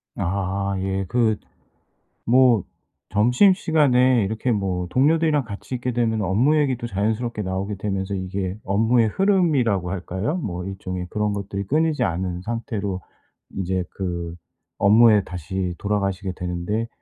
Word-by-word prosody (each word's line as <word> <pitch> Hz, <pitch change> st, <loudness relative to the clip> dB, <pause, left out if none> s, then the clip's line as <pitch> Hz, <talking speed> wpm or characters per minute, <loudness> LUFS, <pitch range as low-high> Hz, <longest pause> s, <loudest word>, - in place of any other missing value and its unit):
아 100 Hz, +2 st, -1 dB
예. 95 Hz, 0 st, -2 dB
그 115 Hz, -1 st, +2 dB, 0.9 s
뭐 125 Hz, -4 st, +4 dB, 0.5 s
점심시간에 130 Hz, -, +4 dB
이렇게 110 Hz, +5 st, -1 dB
뭐 95 Hz, -4 st, -1 dB
동료들이랑 150 Hz, -, +3 dB
같이 110 Hz, +3 st, -8 dB
있게 125 Hz, +1 st, -2 dB
되면은 115 Hz, -3 st, 0 dB
업무 115 Hz, +11 st, +3 dB
얘기도 130 Hz, -5 st, +1 dB
자연스럽게 110 Hz, +3 st, -1 dB
나오게 95 Hz, +1 st, -3 dB
되면서 95 Hz, 0 st, -3 dB
이게 95 Hz, 0 st, -3 dB
업무의 110 Hz, +4 st, +3 dB
흐름이라고 140 Hz, -, +2 dB
할까요. 95 Hz, -, -3 dB
뭐 90 Hz, -, -4 dB
일종의 90 Hz, -1 st, -5 dB
그런 105 Hz, -1 st, -1 dB
것들이 100 Hz, 0 st, -4 dB
끊이지 155 Hz, +4 st, +1 dB
않은 90 Hz, +1 st, -2 dB
상태로 110 Hz, -5 st, -3 dB, 0.6 s
이제 95 Hz, -1 st, -1 dB
그 85 Hz, -3 st, -4 dB, 0.4 s
업무에 105 Hz, 0 st, +6 dB
다시 90 Hz, +1 st, -4 dB
돌아가시게 100 Hz, -2 st, -1 dB
되는데 90 Hz, +6 st, -3 dB
100 Hz, 305 characters per minute, -23 LUFS, 95-120 Hz, 0.9 s, 업무에